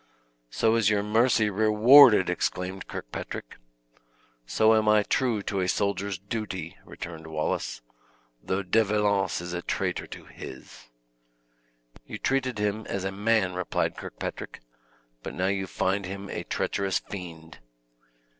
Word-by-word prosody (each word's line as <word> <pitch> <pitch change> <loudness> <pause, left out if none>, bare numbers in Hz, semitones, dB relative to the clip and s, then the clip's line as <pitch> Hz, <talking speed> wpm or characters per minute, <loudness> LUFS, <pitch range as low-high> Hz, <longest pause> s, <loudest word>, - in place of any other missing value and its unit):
"So 110 - +2
is 110 -3 +3
your 105 -1 +1
mercy 110 0 +3
rewarded!" 110 +1 +7
exclaimed 90 +2 -2
Kirkpatrick. - - -7 0.9
"So 110 - +4
am 110 -1 +3
I 105 -1 +5
true 115 -3 0
to 100 - -2
a 90 - 0
soldier's 100 0 -1
duty," 95 -3 -5
returned 80 -1 -8
Wallace, 75 -6 -3 0.6
"though 95 +8 -2
De 110 +5 +3
Valence 105 -3 +1
is 85 0 -6
a 90 - -3
traitor - - -2
to - - -10
his!" 65 -2 -11 1.2
"You - - -6
treated 130 -3 0
him 105 +1 -2
as 100 - -3
a 95 - -2
man," 100 -1 +1
replied 90 0 -1
Kirkpatrick, - - -7 0.6
"but - - -7
now 90 - -1
you 95 -1 -1
find 95 +1 -1
him 100 +1 -7
a - - -5
treacherous 100 -1 -1
fiend!" 85 -4 -9
100 Hz, 135 wpm, -27 LUFS, 90-110 Hz, 1.2 s, rewarded